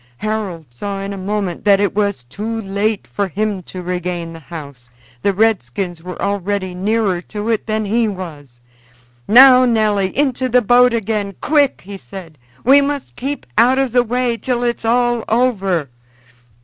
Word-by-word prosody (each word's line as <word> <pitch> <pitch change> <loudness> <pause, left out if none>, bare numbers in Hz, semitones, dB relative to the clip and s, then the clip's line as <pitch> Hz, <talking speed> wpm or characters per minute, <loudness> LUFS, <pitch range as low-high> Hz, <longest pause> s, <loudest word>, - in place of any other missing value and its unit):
Harold 205 - -3
saw 195 +10 -5
in 195 +1 -4
a - - -5
moment 195 -2 -3
that 200 -1 +5
it 200 -1 +1
was 200 -9 -1
too 215 - -5
late 200 +2 -1
for 200 -1 -2
him 205 +2 -2
to 180 0 -9
regain 175 -1 -3
the 165 - -10
house; 140 -6 -10 0.3
the 200 - +2
redskins 185 - -1
were 180 +1 -8
already 200 -1 -2
nearer 195 -1 0
to 210 +3 -5
it 225 -1 -1
than 215 0 -1
he 225 +3 +1
was. 155 - -8 0.7
"Now, 255 +3 +8
Nelly! 215 -5 +2
into 260 -2 +1
the 250 0 +3
boat 245 +3 +5
again 210 -3 -2
quick!" 290 -3 +2
he 200 0 -8
said. 160 +2 -11 0.2
"We 275 +3 +6
must 280 -1 -3
keep 280 +3 -4
out 255 +2 +5
of 270 -2 +1
the 245 +1 +4
way 245 0 -1
till 245 0 -2
it's 235 -1 -2
all 240 0 +2
over." 195 - +1
205 Hz, 165 wpm, -18 LUFS, 185-235 Hz, 0.7 s, Now